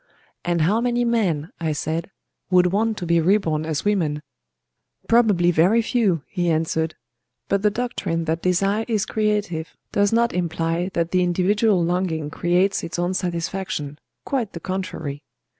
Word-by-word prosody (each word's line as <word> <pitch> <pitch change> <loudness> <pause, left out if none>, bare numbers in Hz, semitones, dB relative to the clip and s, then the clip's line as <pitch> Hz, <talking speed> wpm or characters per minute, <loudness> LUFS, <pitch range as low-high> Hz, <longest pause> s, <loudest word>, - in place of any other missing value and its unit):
"And 175 -1 0
how 205 +9 +2
many 245 0 +1
men," 185 -10 0
I 160 -2 -1
said, 160 +4 -3 0.4
"would 180 -1 +4
want 220 +1 +1
to 180 - -4
be 170 0 +3
reborn 160 -4 +1
as 155 +2 -2
women?" 160 -8 0 0.8
"Probably 210 -7 +4
very 185 +8 +4
few," 205 - +1
he 175 -2 -1
answered. 160 0 0 0.5
"But 200 0 +2
the 210 - +4
doctrine 205 -7 -2
that 160 +1 -1
desire 195 +4 +1
is 215 -3 0
creative 210 -7 -1
does 205 0 +2
not 235 +1 +2
imply 170 0 -1
that 170 0 0
the 185 - +3
individual 185 +2 +2
longing 165 -4 -1
creates 180 +5 +1
its 170 - -5
own 175 +1 0
satisfaction,—quite 180 - -4
the 170 - -6
contrary. 170 -6 -4
180 Hz, 145 wpm, -22 LUFS, 165-205 Hz, 0.8 s, would